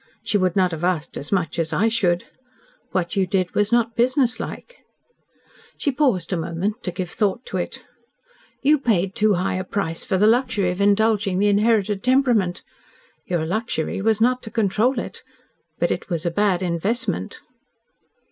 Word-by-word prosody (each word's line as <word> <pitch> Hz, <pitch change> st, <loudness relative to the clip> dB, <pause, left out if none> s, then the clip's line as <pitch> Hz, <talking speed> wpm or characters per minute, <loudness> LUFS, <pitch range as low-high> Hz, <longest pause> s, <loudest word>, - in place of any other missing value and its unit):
She 225 Hz, -2 st, +1 dB
would 185 Hz, -2 st, +1 dB
not 185 Hz, -2 st, +3 dB
have 165 Hz, 0 st, -5 dB
asked 175 Hz, -2 st, -1 dB
as 145 Hz, -, -6 dB
much 170 Hz, -4 st, 0 dB
as 160 Hz, -1 st, -1 dB
I 220 Hz, -, +2 dB
should. 185 Hz, -6 st, +1 dB, 0.7 s
What 175 Hz, -2 st, -1 dB
you 195 Hz, -2 st, +1 dB
did 185 Hz, -2 st, 0 dB
was 210 Hz, +1 st, +1 dB
not 235 Hz, -1 st, +2 dB
businesslike." 255 Hz, -, -1 dB, 1.0 s
She 285 Hz, -, 0 dB
paused 250 Hz, -, +1 dB
a -, -, 0 dB
moment 170 Hz, +6 st, -3 dB
to 180 Hz, -, -3 dB
give 175 Hz, 0 st, -5 dB
thought 210 Hz, +3 st, -1 dB
to -, -, -4 dB
it. -, -, -4 dB, 0.8 s
"You 295 Hz, +2 st, +4 dB
paid 195 Hz, -7 st, +1 dB
too 215 Hz, -2 st, +2 dB
high 185 Hz, +1 st, -1 dB
a 185 Hz, -, -2 dB
price 180 Hz, -4 st, -3 dB
for 190 Hz, -, 0 dB
the 205 Hz, -, +4 dB
luxury 220 Hz, -5 st, +2 dB
of 180 Hz, +2 st, -4 dB
indulging 205 Hz, -1 st, +2 dB
the 205 Hz, +2 st, +3 dB
inherited 205 Hz, -1 st, +2 dB
temperament. 245 Hz, -8 st, +2 dB, 0.6 s
Your 175 Hz, -4 st, -1 dB
luxury 195 Hz, -2 st, -2 dB
was 220 Hz, +1 st, +2 dB
not 250 Hz, +2 st, +2 dB
to 220 Hz, -, -8 dB
control 220 Hz, +4 st, +1 dB
it. -, -, -5 dB, 0.6 s
But -, -, +1 dB
it -, -, -3 dB
was 170 Hz, -3 st, -3 dB
a 170 Hz, -, +1 dB
bad 190 Hz, 0 st, +1 dB
investment." 190 Hz, -, -2 dB
200 Hz, 170 wpm, -22 LUFS, 180-225 Hz, 1.0 s, You